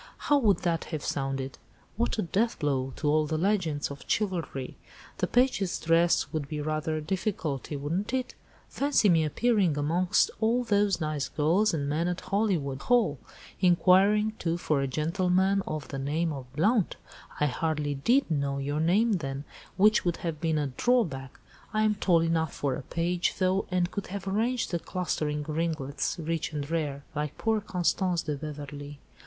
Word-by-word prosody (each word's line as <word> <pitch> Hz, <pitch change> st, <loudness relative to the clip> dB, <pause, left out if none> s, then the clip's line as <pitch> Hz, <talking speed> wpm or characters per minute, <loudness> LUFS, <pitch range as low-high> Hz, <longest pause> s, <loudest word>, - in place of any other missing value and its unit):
How 290 Hz, -1 st, +2 dB
would 205 Hz, -8 st, +3 dB
that 170 Hz, -2 st, 0 dB
have 155 Hz, -4 st, -5 dB
sounded? 135 Hz, -1 st, -3 dB, 0.4 s
What 230 Hz, +3 st, 0 dB
a 215 Hz, -, +1 dB
deathblow 145 Hz, -, 0 dB
to 150 Hz, -, -3 dB
all 155 Hz, +1 st, +3 dB
the 155 Hz, +1 st, -1 dB
legends 170 Hz, -6 st, 0 dB
of 140 Hz, -, -8 dB
chivalry! 175 Hz, -10 st, -2 dB, 0.4 s
The -, -, +1 dB
page's 245 Hz, -7 st, +1 dB
dress 165 Hz, +1 st, +2 dB
would 155 Hz, -3 st, -2 dB
be 150 Hz, +1 st, -4 dB
rather 155 Hz, +1 st, -1 dB
a -, -, -3 dB
difficulty, 160 Hz, -, -2 dB
wouldn't 165 Hz, +10 st, -2 dB
it? 255 Hz, -1 st, -2 dB, 0.3 s
Fancy 280 Hz, -7 st, +2 dB
me 165 Hz, -3 st, +4 dB
appearing 190 Hz, -1 st, +2 dB
amongst 170 Hz, +5 st, +2 dB
all 230 Hz, +3 st, +2 dB
those 205 Hz, -5 st, +2 dB
nice 155 Hz, -3 st, -2 dB
girls 175 Hz, +8 st, +2 dB
and 145 Hz, -4 st, -2 dB
men 155 Hz, +4 st, 0 dB
at 180 Hz, 0 st, -2 dB
Hollywood 185 Hz, -10 st, 0 dB
Hall! 220 Hz, -, +2 dB, 0.4 s
Inquiring, 195 Hz, +4 st, +4 dB
too, 165 Hz, 0 st, -1 dB
for 150 Hz, -5 st, 0 dB
'a 135 Hz, -, 0 dB
gentleman 180 Hz, +7 st, +1 dB
of 155 Hz, -3 st, -4 dB
the 135 Hz, -, -4 dB
name 155 Hz, +4 st, -1 dB
of 130 Hz, -3 st, -8 dB
Blount!' 205 Hz, +5 st, +2 dB, 0.4 s
I 150 Hz, -, +3 dB
hardly 150 Hz, +1 st, -1 dB
did 235 Hz, -, +2 dB
know 140 Hz, -2 st, 0 dB
your 145 Hz, +2 st, -2 dB
name 195 Hz, +9 st, +3 dB
then, 135 Hz, -3 st, -4 dB, 0.3 s
which 215 Hz, +3 st, +5 dB
would 175 Hz, -2 st, 0 dB
have 155 Hz, -3 st, -3 dB
been 160 Hz, -2 st, +1 dB
a 150 Hz, -, 0 dB
drawback. 135 Hz, -, 0 dB, 0.4 s
I 215 Hz, -, +3 dB
am 215 Hz, 0 st, +3 dB
tall 180 Hz, -5 st, +3 dB
enough 165 Hz, -1 st, 0 dB
for 140 Hz, -2 st, -1 dB
a 130 Hz, -, -4 dB
page, 170 Hz, +5 st, -1 dB
though, 185 Hz, +1 st, +1 dB
and 180 Hz, -1 st, 0 dB
could 200 Hz, -, -4 dB
have 195 Hz, +1 st, -6 dB
arranged 230 Hz, +5 st, 0 dB
the 170 Hz, -, 0 dB
'clustering 155 Hz, -5 st, -2 dB
ringlets, 155 Hz, -3 st, -2 dB
rich 165 Hz, -1 st, -2 dB
and 145 Hz, -2 st, -3 dB
rare,' 145 Hz, -4 st, -2 dB
like 150 Hz, 0 st, -3 dB
poor 220 Hz, -1 st, +1 dB
Constance 180 Hz, -2 st, 0 dB
de 150 Hz, -2 st, -2 dB
Beverley. 145 Hz, -1 st, -7 dB
165 Hz, 170 wpm, -28 LUFS, 145-195 Hz, 0.4 s, which